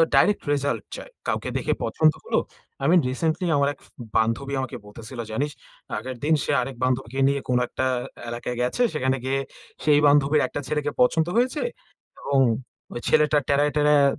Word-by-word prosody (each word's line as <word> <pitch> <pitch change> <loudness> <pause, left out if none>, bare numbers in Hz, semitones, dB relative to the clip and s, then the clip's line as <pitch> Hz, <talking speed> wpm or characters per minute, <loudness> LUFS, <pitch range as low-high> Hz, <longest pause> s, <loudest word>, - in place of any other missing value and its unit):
Direct 205 - +4
result 140 0 -1
চায়। - - -10 0.2
কাউকে - - -1
দেখে - - 0
পছন্দ 155 -1 +3
হল; - - -2 0.5
আমি 160 +6 +5
রিসেন্টলি 160 +7 -1
আমার 140 0 +3
এক - - -23
ফে - - -24 0.3
বান্ধবী 115 +5 0
আমাকে 130 - -5
বলতেছিল, 110 +4 -10
"জানিস?" 140 +7 -1 0.5
আগের 130 +4 -5
দিন 155 +2 +3
সে - - -1
আরেক 130 +1 -5
বান্ধবীকে 130 0 -1
নিয়ে 140 0 +1
কোন 125 - +3
একটা 130 - -2 0.4
এলাকায় 120 +1 -4
গেছে। 125 - 0
সেখানে 130 -3 0
গিয়ে 135 +1 0 0.4
সেই 150 -1 +5
বান্ধবীর 145 +1 +4
একটা 145 - -5
ছেলেকে 150 +1 -1
পছন্দ 160 +6 +3
হয়েছে 255 +5 +1 0.6
এবং 140 -1 +1 0.5
ওই - - -4
ছেলেটা 150 0 +4
টেরায়, 145 +1 +3
টেরায় 150 -1 +5
140 Hz, 165 wpm, -24 LUFS, 130-150 Hz, 0.6 s, আমি